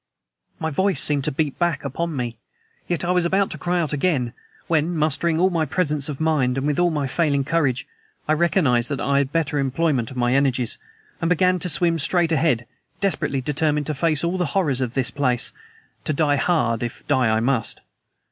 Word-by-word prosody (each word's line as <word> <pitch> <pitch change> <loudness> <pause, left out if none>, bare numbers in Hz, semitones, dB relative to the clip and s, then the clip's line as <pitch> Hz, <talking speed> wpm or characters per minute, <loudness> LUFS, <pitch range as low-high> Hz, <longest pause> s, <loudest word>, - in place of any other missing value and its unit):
My 160 0 -3
voice 190 +5 +1
seemed 145 -2 +1
to 155 - +1
beat 145 0 -2
back 175 -5 0
upon 165 +4 -3
me, 120 -3 -4 0.5
yet 175 0 -1
I 175 - +1
was 180 -1 +2
about 195 +3 +1
to - - -6
cry 175 0 0
out 155 -4 -1
again, 135 -6 0 0.3
when, 165 +1 +1
mustering 160 +2 +1
all 185 +2 +3
my 165 -2 +1
presence 150 -4 -1
of 140 - -5
mind 145 -5 +1
and 145 +3 0
all 175 0 +4
my 150 -4 -1
failing 140 0 +1
courage, 135 -4 0 0.4
I 155 - +3
recognized 155 -7 +2
that 140 -3 -2
I 140 +1 +2
had 140 -1 -1
better 155 -2 0
employment 135 -3 0
of 130 - -9
my 120 0 +2
energies, 130 -3 +1 0.4
and 165 - +1
began 180 +1 +3
to 180 - -1
swim 165 +1 +1
straight 165 +2 +2
ahead, 145 -7 +2 0.3
desperately 185 -8 0
determined 150 +1 0
to 155 - -2
face 155 +1 0
all 175 +2 -1
the 180 - +1
horrors 145 -9 +1
of 125 -2 -2
this 130 -3 +2
place 130 -4 0 0.5
to 155 - 0
die 145 -1 +2
hard 120 -8 +1
if 120 0 -6
die 130 -5 +2
I 110 0 +2
must. 120 -1 -1
150 Hz, 200 wpm, -22 LUFS, 135-170 Hz, 0.5 s, all